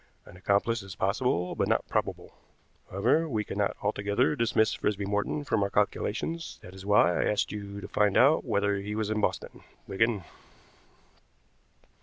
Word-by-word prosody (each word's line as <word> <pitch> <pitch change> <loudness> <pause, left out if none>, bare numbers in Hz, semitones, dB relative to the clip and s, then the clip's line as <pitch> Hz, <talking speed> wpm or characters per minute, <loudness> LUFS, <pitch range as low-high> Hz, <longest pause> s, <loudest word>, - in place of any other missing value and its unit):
An - - -14
accomplice 100 +5 +1
is 95 -2 -9
possible, 95 -3 0
but - - 0
not - - +1
probable. - - -3 0.6
However, 155 - +1
we 110 -5 -1
cannot 100 0 -2
altogether 105 +7 +1
dismiss 115 -3 +2
Frisby 100 -1 -1
Morton 105 +8 -1
from 115 -7 0
our 100 - +1
calculations, 110 +10 -1
that 90 - -11
is 95 0 -10
why 100 -3 +4
I - - +1
asked 105 - 0
you 100 -1 -6
to - - -7
find 105 -1 +2
out 145 +4 +5
whether 100 -4 0
he 105 +2 -4
was 110 -1 -1
in 110 0 0
Boston, - - -3 0.2
Wigan." 105 0 0
105 Hz, 160 wpm, -28 LUFS, 100-115 Hz, 0.6 s, out